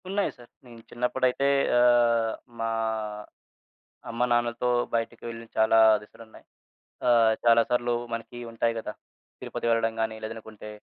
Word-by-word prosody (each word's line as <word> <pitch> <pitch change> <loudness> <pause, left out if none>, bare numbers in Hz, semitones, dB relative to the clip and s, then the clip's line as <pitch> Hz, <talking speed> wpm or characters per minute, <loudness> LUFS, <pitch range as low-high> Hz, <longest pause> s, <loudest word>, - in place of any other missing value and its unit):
ఉన్నాయి 200 +1 0
సారు. 120 -1 -16 0.2
నేను 120 -2 -13
చిన్నప్పుడైతే 125 +2 0 0.3
ఆహ్, 120 -2 +3 0.3
మా 115 0 -1 1.4
అమ్మ, 115 - -6
నాన్నలతో 120 0 0 0.3
బయటికి 115 0 -3
వెళ్ళి 115 0 -8
చాలా 110 0 +4 0.2
దిశలున్నాయి. 110 +1 -16 0.6
ఆహ్, 115 -2 +5
చాలా 115 0 +6
సార్లు 120 0 +1 0.2
మనకి 115 +1 -6
ఉంటాయి 115 0 0
గదా! 105 - -6 0.5
తిరుపతి - - -4
వెళ్ళడం 115 -1 +1
గాని, 110 0 -2
లేదనుకుంటే 110 -1 -8
115 Hz, 120 wpm, -26 LUFS, 115-120 Hz, 1.4 s, చాలా